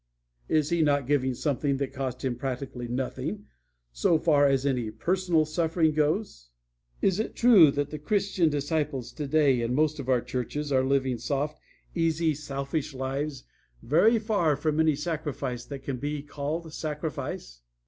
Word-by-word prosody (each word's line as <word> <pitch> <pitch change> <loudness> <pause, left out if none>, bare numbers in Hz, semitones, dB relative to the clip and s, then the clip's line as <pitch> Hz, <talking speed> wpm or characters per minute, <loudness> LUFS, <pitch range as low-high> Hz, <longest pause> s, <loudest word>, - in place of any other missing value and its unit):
Is 155 -1 +2
he 170 -1 +2
not 145 -3 +2
giving 130 -2 +1
something 140 0 0
that 135 -1 -3
cost 130 -1 -4
him 125 -2 0
practically 125 -1 -4
nothing 130 - -3 0.5
so - - +2
far 145 -3 +4
as 135 -1 +1
any 125 -5 0
personal 170 - +1
suffering 160 0 +1
goes? 150 - -1 0.5
Is 190 +1 +2
it 220 - -3
true 215 -10 +7
that 145 +1 -2
the 150 - -5
Christian 190 +1 +1
disciples 145 -3 -2
today 145 -3 +2
in 120 +2 -1
most 155 +1 +1
of 130 -2 -5
our 125 -2 +3
churches 145 +5 -4
are 130 -1 +3
living 130 -2 +1
soft, 140 +5 -2 0.3
easy, 165 -1 +1
selfish 140 0 -4
lives, 135 +2 -3 0.4
very 190 - +4
far 205 -9 +1
from 150 +2 -1
any 160 -2 +4
sacrifice 150 -6 -3
that 140 -2 -8
can 135 -2 -3
be 145 +2 -3
called 150 +3 -4
sacrifice? 150 - -5
145 Hz, 155 wpm, -27 LUFS, 130-160 Hz, 0.5 s, true